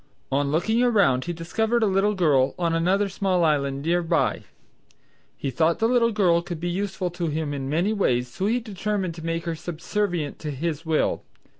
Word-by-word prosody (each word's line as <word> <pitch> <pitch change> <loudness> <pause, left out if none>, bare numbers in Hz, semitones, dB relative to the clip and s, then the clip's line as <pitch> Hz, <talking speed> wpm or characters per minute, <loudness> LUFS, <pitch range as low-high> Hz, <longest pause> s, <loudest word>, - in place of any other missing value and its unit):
On 140 +1 +1
looking 220 +10 +1
around 200 - +3
he 175 - -2
discovered 220 +8 0
a - - +5
little 200 +1 +2
girl 145 -8 +2
on 170 -2 0
another 185 +5 +2
small 190 -2 0
island 140 -3 +1
near 175 +2 +2
by. 165 - 0 0.9
He 135 - -3
thought 165 +3 +2
the 225 - +2
little 235 -1 +3
girl 180 -6 +3
could 170 -1 -6
be 175 +2 -2
useful 190 -1 -2
to 175 -1 -3
him 155 -1 -2
in 135 -1 -4
many 175 +8 +1
ways 125 - +1
so 185 +11 -3
he 235 +3 +2
determined 205 -4 -3
to 165 -1 -10
make 165 +1 -2
her 170 - -1
subservient 170 0 -3
to 155 - -5
his 160 +3 -3
will. 160 -1 +1
170 Hz, 190 wpm, -24 LUFS, 155-200 Hz, 0.9 s, a